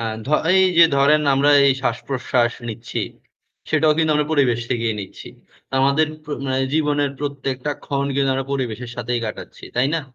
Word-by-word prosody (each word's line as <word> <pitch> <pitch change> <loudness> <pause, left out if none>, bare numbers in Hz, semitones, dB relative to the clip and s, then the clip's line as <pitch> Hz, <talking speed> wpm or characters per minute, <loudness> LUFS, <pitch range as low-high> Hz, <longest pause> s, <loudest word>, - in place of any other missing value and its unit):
আ - - -3 0.2
ধ - - -7 0.3
এই 190 - +5 0.2
যে 170 - +10
ধরেন 145 +2 +4
আমরা 140 +2 +3 0.2
এই 135 - +5
শ্বাসপ্রশ্বাস 125 -3 0 0.2
নিচ্ছি। 115 +1 -6 0.7
সেটাও 155 0 +3
কিন্তু 160 -1 +2
আমরা 150 0 +1
পরিবেশ 125 -6 +2
থেকেই 115 -3 0
নিচ্ছি। 95 - -10 0.5
আমাদের 140 +4 +3 0.2
প্র 150 - -6
মানে 130 0 0
জীবনের 145 -2 +1
প্রত্যেকটা 140 -1 -3
ক্ষণ 140 -1 -1
কিন্তু 135 -1 +1
আমরা 135 0 -3
পরিবেশের 125 -3 -3
সাথেই 120 0 -2
কাটাচ্ছি, 105 - -8
তাই 125 +2 +2
না? 165 - 0
135 Hz, 165 wpm, -21 LUFS, 125-145 Hz, 0.7 s, যে